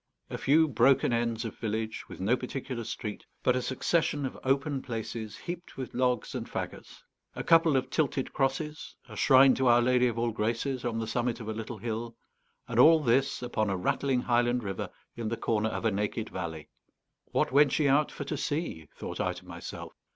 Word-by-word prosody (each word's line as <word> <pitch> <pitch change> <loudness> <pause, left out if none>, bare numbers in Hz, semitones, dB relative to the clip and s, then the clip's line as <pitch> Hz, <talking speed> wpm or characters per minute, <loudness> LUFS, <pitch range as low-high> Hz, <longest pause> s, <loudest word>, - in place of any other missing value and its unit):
A - - -3
few 160 +3 +4
broken 130 -1 +3
ends 115 -1 0
of 115 - -7
village, 110 0 -3
with - - -9
no 105 +6 +2
particular 130 -1 -5
street, 105 -1 -5 0.2
but 125 - +3
a 125 - 0
succession 145 +3 0
of 130 - -4
open 135 +1 +1
places 115 -3 -5
heaped 175 0 -7
with 130 -2 -5
logs 125 -2 0
and - - -5
fagots; - - -6 0.3
a - - -4
couple 165 -3 +5
of 130 - -2
tilted 140 -4 0
crosses, 150 +3 -2
a - - -10
shrine 135 -1 +6
to 130 - +1
Our 120 0 +6
Lady 125 +1 +3
of 115 -2 -2
all 115 0 +1
Graces 115 +4 -1
on 120 -2 -1
the 115 - -1
summit 120 +1 -1
of 110 - -7
a - - -1
little 115 +1 -6
hill; 115 +2 -4 0.5
and - - -1
all 160 0 +8
this, 130 0 +1
upon 110 -4 0
a 95 - 0
rattling 130 +7 0
highland 120 0 +1
river, 95 -2 -4 0.3
in 115 -2 -3
the 115 - -2
corner 110 -1 0
of - - -4
a 110 - +3
naked 105 +2 -2
valley. 80 -4 -5 0.6
What - - 0
went 140 0 +5
ye 150 - +3
out 145 +2 +3
for - - -5
to 150 - -3
see? 145 - -3
thought - - -5
I - - 0
to - - -12
myself. - - -8
120 Hz, 200 wpm, -29 LUFS, 115-135 Hz, 0.6 s, all